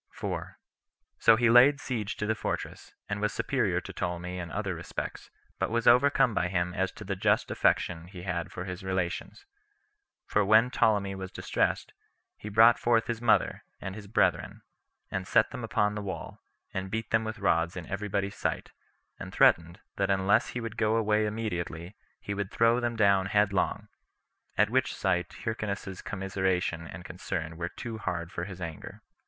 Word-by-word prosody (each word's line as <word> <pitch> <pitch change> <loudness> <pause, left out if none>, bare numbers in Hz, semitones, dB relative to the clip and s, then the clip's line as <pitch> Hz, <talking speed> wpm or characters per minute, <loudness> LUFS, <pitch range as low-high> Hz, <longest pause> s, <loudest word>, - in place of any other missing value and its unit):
So 115 - +7
he 120 -1 +4
laid 135 +4 +7
siege 110 -8 -3
to 105 - -2
the 110 - +1
fortress, 110 - -5
and 105 0 -3
was 105 - +1
superior - - 0
to - - -9
Ptolemy 90 0 -3
in 85 -2 -5
other 100 -1 -2
respects, 85 0 -6 0.3
but - - 0
was 115 +1 0
overcome 130 0 +5
by 90 -2 +1
him 90 -1 -1
as 95 0 0
to - - -10
the 100 -1 -3
just 95 - +1
affection 85 -1 +1
[he 90 -1 -10
had 85 -3 -3
for 90 - -6
his 90 0 -6
relations]; 95 - -3 0.8
for 105 - +2
when 110 +5 +5
Ptolemy 100 -5 +2
was 95 -1 -6
distressed, - - -1 0.4
he 105 - -8
brought 115 +3 +6
forth 115 -1 +3
his 115 -1 -3
mother, 120 -2 +2 0.2
and 95 - -5
his 105 -1 -9
brethren, 95 -5 +1 0.5
and 95 -1 -3
set 115 -2 +3
them 125 - -6
upon 110 -2 +1
the 105 - -4
wall, 95 -2 -6 0.3
and 95 0 -3
beat 110 +2 -4
them 110 0 +3
with 110 +1 -4
rods 85 -4 +1
in 90 - -5
every 100 +4 -4
body's 100 0 -1
sight, - - -3 0.5
and - - -7
threatened, 85 +3 +3 0.2
that 100 0 +1
unless 100 +3 +3
he 125 - -4
would 115 -2 -6
go 110 0 +2
away 110 -1 +2
immediately, 90 -4 -4 0.2
he 100 - -4
would 100 -1 -3
throw 115 +1 +3
them 120 -1 -1
down 100 -3 +3
headlong; 100 -1 +1 0.7
at 105 +1 +3
which 130 0 +1
sight 90 -3 0
Hyrcanus's 100 -4 -3
commiseration 95 -4 -1
and 85 - -9
concern 80 0 -4
were 85 +1 -3
too 115 0 -7
hard 85 -4 -3
for 85 - -4
his 95 -1 -8
anger. 85 -3 -7
100 Hz, 175 wpm, -29 LUFS, 90-110 Hz, 0.8 s, So